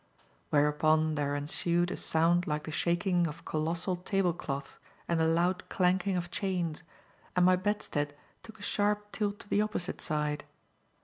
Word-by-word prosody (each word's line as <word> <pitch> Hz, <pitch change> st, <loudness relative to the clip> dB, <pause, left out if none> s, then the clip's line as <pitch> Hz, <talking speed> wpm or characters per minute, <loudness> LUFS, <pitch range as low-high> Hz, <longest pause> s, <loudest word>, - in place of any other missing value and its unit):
whereupon 155 Hz, +2 st, +3 dB
there 145 Hz, -1 st, 0 dB
ensued 170 Hz, +4 st, 0 dB
a -, -, -2 dB
sound 170 Hz, +2 st, +2 dB
like 150 Hz, -1 st, -1 dB
the 155 Hz, -, -6 dB
shaking 175 Hz, +2 st, +1 dB
of 150 Hz, -, -8 dB
colossal 165 Hz, +4 st, -1 dB
table 180 Hz, -1 st, +1 dB
cloths 140 Hz, -4 st, -5 dB, 0.3 s
and 170 Hz, -1 st, +1 dB
the 160 Hz, -, +3 dB
loud 175 Hz, +3 st, +1 dB
clanking 185 Hz, +1 st, +2 dB
of 175 Hz, -1 st, -4 dB
chains, 175 Hz, -5 st, -1 dB, 0.5 s
and 180 Hz, -1 st, +5 dB
my 185 Hz, 0 st, +6 dB
bedstead 180 Hz, -7 st, -1 dB, 0.3 s
took 220 Hz, -1 st, -12 dB
a -, -, -10 dB
sharp 205 Hz, 0 st, 0 dB
tilt 205 Hz, -1 st, -1 dB
to -, -, -11 dB
the 205 Hz, -, +2 dB
opposite 210 Hz, -4 st, -3 dB
side. 150 Hz, -2 st, -1 dB
175 Hz, 160 wpm, -31 LUFS, 155-185 Hz, 0.5 s, my